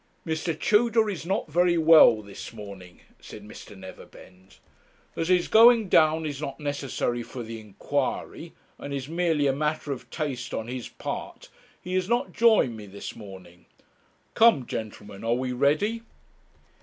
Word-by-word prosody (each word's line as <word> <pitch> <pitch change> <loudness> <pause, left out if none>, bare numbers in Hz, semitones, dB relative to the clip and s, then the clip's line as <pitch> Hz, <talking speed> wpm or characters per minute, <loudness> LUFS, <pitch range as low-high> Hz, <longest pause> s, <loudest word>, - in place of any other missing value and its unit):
'Mr. 160 -1 -3
Tudor 220 0 +3
is 170 -3 -7
not 195 0 -1
very 175 +2 +2
well 155 -9 +6
this 100 -1 -9
morning,' 100 -5 -11 0.2
said 105 - -11
Mr. 105 -1 -12
Neverbend. 95 0 -14 0.6
'As 165 - -2
his 180 -1 +2
going 230 -2 +6
down 160 0 +3
is 145 -2 -5
not 140 -3 -5
necessary 140 -4 -2
for 120 +1 -8
the 115 0 -7
inquiry, 105 -3 -4 0.3
and 140 0 -5
is 135 -1 -5
merely 165 -2 0
a 135 - +2
matter 150 +1 -2
of 125 -2 -7
taste 135 -5 -4
on 110 - -4
his 125 -1 -6
part, - - -7 0.3
he 180 - -7
has 185 +1 0
not 240 +1 0
joined 220 - +3
me 105 -2 -10
this 100 +1 -8
morning. 95 -5 -13 0.7
Come, 220 - +4
gentlemen, 105 -3 -7
are 115 +1 +1
we 130 0 -2
ready?' 150 - +1
140 Hz, 155 wpm, -26 LUFS, 110-170 Hz, 0.7 s, well